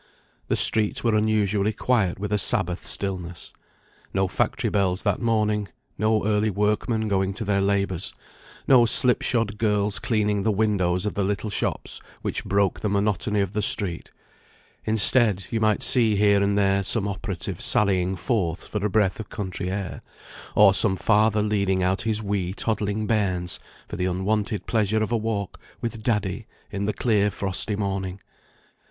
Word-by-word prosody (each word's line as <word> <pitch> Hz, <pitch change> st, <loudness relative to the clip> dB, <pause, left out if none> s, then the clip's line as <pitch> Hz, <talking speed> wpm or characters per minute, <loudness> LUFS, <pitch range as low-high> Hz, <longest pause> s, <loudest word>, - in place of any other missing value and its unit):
The -, -, +1 dB
streets 105 Hz, -2 st, +2 dB
were 115 Hz, -2 st, +2 dB
unusually 105 Hz, -1 st, +1 dB
quiet 110 Hz, -9 st, 0 dB
with 105 Hz, +1 st, -4 dB
a 105 Hz, -, +2 dB
Sabbath 90 Hz, -1 st, +1 dB
stillness. 90 Hz, -3 st, -3 dB, 0.6 s
No 95 Hz, 0 st, +2 dB
factory -, -, -1 dB
bells 95 Hz, -2 st, 0 dB
that 100 Hz, 0 st, 0 dB
morning; 105 Hz, -3 st, 0 dB, 0.3 s
no 110 Hz, 0 st, +1 dB
early 105 Hz, 0 st, +1 dB
workmen 105 Hz, +2 st, 0 dB
going 95 Hz, -1 st, 0 dB
to 110 Hz, -, -3 dB
their 100 Hz, -1 st, +1 dB
labours; 100 Hz, -3 st, -1 dB, 0.5 s
no 120 Hz, -3 st, +6 dB
slip 125 Hz, +2 st, +4 dB
shod 115 Hz, -4 st, 0 dB
girls 105 Hz, -2 st, +1 dB
cleaning 105 Hz, -3 st, 0 dB
the 110 Hz, -, +1 dB
windows 95 Hz, -3 st, 0 dB
of 105 Hz, -, -2 dB
the 100 Hz, -, -1 dB
little 105 Hz, +2 st, -2 dB
shops -, -, -2 dB, 0.2 s
which -, -, -2 dB
broke 100 Hz, -1 st, 0 dB
the 105 Hz, -, -2 dB
monotony 105 Hz, 0 st, 0 dB
of 100 Hz, -2 st, -2 dB
the 105 Hz, +1 st, -2 dB
street; 95 Hz, -4 st, -1 dB, 0.8 s
instead, 110 Hz, -2 st, +4 dB
you 115 Hz, -, 0 dB
might 110 Hz, -1 st, +1 dB
see 115 Hz, -4 st, +4 dB
here 100 Hz, 0 st, +3 dB
and 100 Hz, 0 st, +1 dB
there 100 Hz, -1 st, +2 dB
some 100 Hz, +1 st, +2 dB
operative 95 Hz, -2 st, -4 dB
sallying 95 Hz, -2 st, +3 dB
forth 90 Hz, -4 st, -2 dB
for 105 Hz, -2 st, -4 dB
a 105 Hz, -, +1 dB
breath 100 Hz, -1 st, +1 dB
of 110 Hz, -, -7 dB
country 95 Hz, -3 st, -5 dB
air, 95 Hz, -2 st, -5 dB, 0.5 s
or 100 Hz, -2 st, +6 dB
some 100 Hz, 0 st, +2 dB
father 105 Hz, +1 st, +2 dB
leading 100 Hz, -3 st, 0 dB
out 95 Hz, +2 st, 0 dB
his 110 Hz, -1 st, -1 dB
wee 100 Hz, -2 st, -2 dB
toddling 105 Hz, -1 st, -1 dB
bairns 95 Hz, -6 st, +1 dB, 0.3 s
for -, -, -7 dB
the 90 Hz, -, -1 dB
unwonted 100 Hz, +2 st, -1 dB
pleasure 110 Hz, -1 st, +1 dB
of 110 Hz, -, -4 dB
a 120 Hz, -, +2 dB
walk 105 Hz, -3 st, -4 dB, 0.2 s
with 115 Hz, -1 st, -5 dB
"Daddy," 105 Hz, -5 st, -2 dB, 0.2 s
in 100 Hz, +1 st, -3 dB
the 105 Hz, -, 0 dB
clear 105 Hz, -4 st, +1 dB
frosty 100 Hz, +1 st, -1 dB
morning. 95 Hz, -2 st, -3 dB
105 Hz, 165 wpm, -24 LUFS, 95-110 Hz, 0.8 s, no